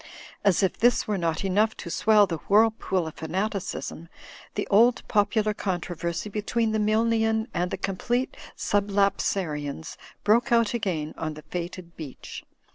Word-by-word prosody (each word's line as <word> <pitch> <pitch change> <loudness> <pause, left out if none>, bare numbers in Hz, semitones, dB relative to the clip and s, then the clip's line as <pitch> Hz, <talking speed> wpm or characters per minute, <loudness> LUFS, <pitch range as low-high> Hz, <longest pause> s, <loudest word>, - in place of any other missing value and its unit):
As 200 -1 +3
f 190 - +2
this 240 +1 +4
Avere 205 -3 -2
not 165 +1 -1
enough 210 +3 +2
to 170 - -7
swell 210 +1 +5
the 165 -4 -4
whirlpool 210 -4 +3
of 160 - -8
f 160 - -5
anati 200 +4 0
asm, 170 -3 -6 0.5
the - - -1
old 230 +4 +4
popular 210 +1 +2
controversy 175 -2 -3
between 215 +2 -1
the 220 - 0
Milnian 220 +1 +2
ind 180 +1 0
the - - -3
Complete 235 +7 -1 0.2
Sublapsarians 195 -7 0 0.3
broke 235 +5 +3
out 230 -2 +3
again 180 -10 -2
on 155 -1 -3
he 155 - -9
fated 175 0 -5
beach. 150 -5 -8
200 Hz, 150 wpm, -26 LUFS, 170-220 Hz, 0.5 s, swell